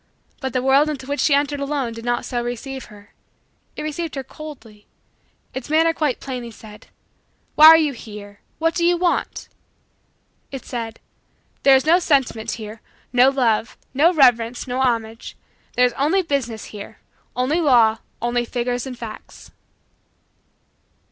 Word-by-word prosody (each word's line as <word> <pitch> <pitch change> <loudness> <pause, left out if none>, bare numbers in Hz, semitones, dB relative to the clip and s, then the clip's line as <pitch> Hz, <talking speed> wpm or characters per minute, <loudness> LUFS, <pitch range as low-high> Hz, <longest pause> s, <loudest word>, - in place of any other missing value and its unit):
But 265 -3 -4
the 255 -1 0
world 275 +3 +4
into 275 -4 -5
which 285 +2 -3
she 290 - +4
entered 285 0 0
alone 280 -4 -2
did 230 0 -9
not 240 0 -1
so 240 -1 -2
receive 255 +2 -5
her. 205 0 -17 0.6
It - - -5
received 310 +1 -4
her 270 - -4
coldly. 235 -8 -12 0.7
Its 260 +2 -6
manner 325 +2 +4
said - - -11
quite 295 -6 -1
plainly: 250 -3 -6 1.0
"Why 310 - +9
are 325 0 +10
you 305 -3 +1
here? 205 -3 -11 0.2
What 330 +1 +1
do 340 - -1
you 350 0 +3
want?" 350 0 -1 1.0
It 270 -2 -7
said: 230 -2 -5 0.6
"There 275 -1 +6
is 265 - +2
no 335 +3 +5
sentiment 270 -9 0
here, 215 -1 -8 0.3
no 250 +2 +6
love, 235 -4 0 0.2
no 305 +6 +4
reverence, 245 -6 +3
no 255 +1 -2
homage; 230 -3 -2 0.4
there 250 - +5
is 245 - 0
only 315 +10 +1
business 255 -10 -3
here, 205 -1 -9 0.4
only 275 +7 +1
law, 235 -7 +4 0.2
only 240 0 0
figures 245 +1 -3
and 255 -2 -7
facts." 225 -3 -10
260 Hz, 155 wpm, -21 LUFS, 235-295 Hz, 1.0 s, are